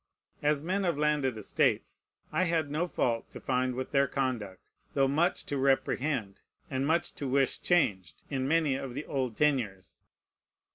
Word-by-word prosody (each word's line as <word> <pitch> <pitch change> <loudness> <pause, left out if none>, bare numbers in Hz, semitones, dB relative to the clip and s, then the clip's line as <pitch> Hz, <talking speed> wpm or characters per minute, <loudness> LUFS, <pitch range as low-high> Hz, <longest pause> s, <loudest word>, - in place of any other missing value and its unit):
As 150 0 +2
men 190 +4 0
of 170 -5 +1
landed 150 -5 +1
estates, 105 - 0 0.3
I 185 - +2
had 160 -4 0
no 160 +4 0
fault 115 -8 -1
to - - -9
find 130 -1 0
with 130 +1 -4
their 140 -1 +3
conduct, 120 -9 -2 0.4
though 135 -1 +4
much 155 +6 +1
to 140 - -2
reprehend, 135 -5 0 0.3
and 135 +1 0
much 165 +2 +1
to 140 - -4
wish 135 +1 +1
changed, 95 - +1
in 130 -2 -2
many 155 -2 +3
of 130 -2 -4
the 145 - -4
old 130 -5 -2
tenures. 110 - 0
135 Hz, 160 wpm, -30 LUFS, 125-150 Hz, 0.4 s, though